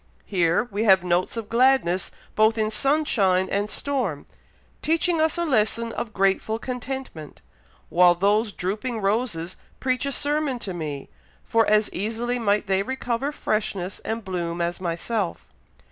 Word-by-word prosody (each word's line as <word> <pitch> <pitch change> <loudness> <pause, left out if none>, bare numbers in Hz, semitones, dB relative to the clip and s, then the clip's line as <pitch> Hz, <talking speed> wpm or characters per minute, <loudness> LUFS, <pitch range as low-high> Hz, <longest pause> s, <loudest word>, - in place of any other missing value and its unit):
Here 175 -1 +2
we 205 +3 -1
have 190 -3 +6
notes 180 +5 0
of 225 -2 -4
gladness 235 -7 +3 0.3
both 220 +1 +4
in 215 0 0
sunshine 215 -8 +2
and 205 +1 0
storm, 245 - -2 0.6
teaching 330 +1 +1
us 320 +2 +1
a 345 - 0
lesson 230 -4 +1
of 220 - -4
grateful 195 +2 +1
contentment, 250 - -6 0.5
while 175 0 +5
those 205 +4 +2
drooping 215 +6 -3
roses 195 -5 -1 0.2
preach 255 +1 0
a - - -1
sermon 290 -1 0
to 200 -5 -5
me, 150 -5 -5 0.3
for 225 0 +2
as 215 0 +4
easily 230 +5 -2
might 210 -2 +1
they 195 -1 +1
recover 260 +3 -2
freshness 200 -8 -2
and 225 -1 -4
bloom 175 -2 -3
as 170 +1 -2
myself. 180 +3 -3
215 Hz, 145 wpm, -24 LUFS, 185-250 Hz, 0.6 s, have